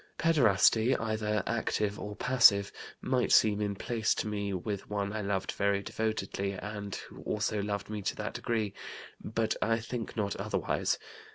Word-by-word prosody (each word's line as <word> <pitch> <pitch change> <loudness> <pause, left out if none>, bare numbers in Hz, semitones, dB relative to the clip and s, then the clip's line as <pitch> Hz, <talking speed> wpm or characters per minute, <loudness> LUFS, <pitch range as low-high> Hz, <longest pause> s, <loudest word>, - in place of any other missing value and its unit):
Pederasty, 120 - +4
either 110 -2 -1
active 105 -2 -1
or 105 0 -6
passive, 105 -6 +5 0.3
might 130 -1 +1
seem 105 -1 +5
in 100 -1 -1
place 115 +1 0
to - - -2
me 100 -1 -2
with 100 +2 -4
one 100 -1 -2
I 110 - -2
loved 95 -1 -1
very 100 0 0
devotedly 100 -2 -2
and 100 +1 -5
who - - -10
also 105 0 -1
loved 100 0 -3
me 105 -1 -4
to - - -2
that - - -4
degree; 110 -4 -1 0.5
but 110 +1 0
I 115 0 +2
think 115 0 -5
not 100 -2 0
otherwise. - - 0
105 Hz, 160 wpm, -31 LUFS, 100-110 Hz, 0.5 s, passive